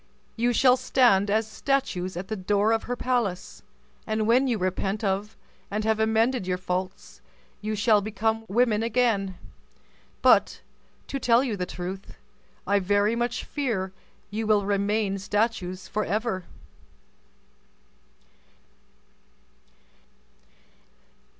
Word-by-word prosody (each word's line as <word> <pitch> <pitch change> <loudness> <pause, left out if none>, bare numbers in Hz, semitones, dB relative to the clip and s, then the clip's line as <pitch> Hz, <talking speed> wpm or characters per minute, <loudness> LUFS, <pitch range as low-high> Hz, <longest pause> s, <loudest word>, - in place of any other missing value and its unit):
You 240 +1 +1
shall 255 +1 +5
stand 240 -6 +3
as 215 +1 +1
statues 215 -7 -1
at 185 +2 -5
the 220 - -3
door 205 +2 +1
of 225 -1 0
her 245 - -2
palace, 240 -8 -2 0.5
and 215 0 0
when 250 +4 +4
you 240 -3 +1
repent 195 +2 -2
of, 200 +1 -2 0.3
and 210 +2 -2
have 220 0 +1
amended 220 0 +1
your 180 -1 0
faults, 180 - -5 0.4
you 215 0 -2
shall 210 0 +3
become 220 +2 -1
women 220 0 +2
again. 225 -5 +1 0.9
But, - - +4 0.4
to 275 - -4
tell 240 0 +4
you 240 -6 -2
the 180 -2 -3
truth, 185 +2 -7 0.5
I 200 0 +2
very 205 +3 +2
much 240 0 -2
fear 220 -10 -2 0.4
you 220 +1 -3
will 210 -2 +3
remain 200 0 0
statues 195 -3 -1
forever." 215 -2 -2
215 Hz, 115 wpm, -26 LUFS, 195-230 Hz, 0.9 s, shall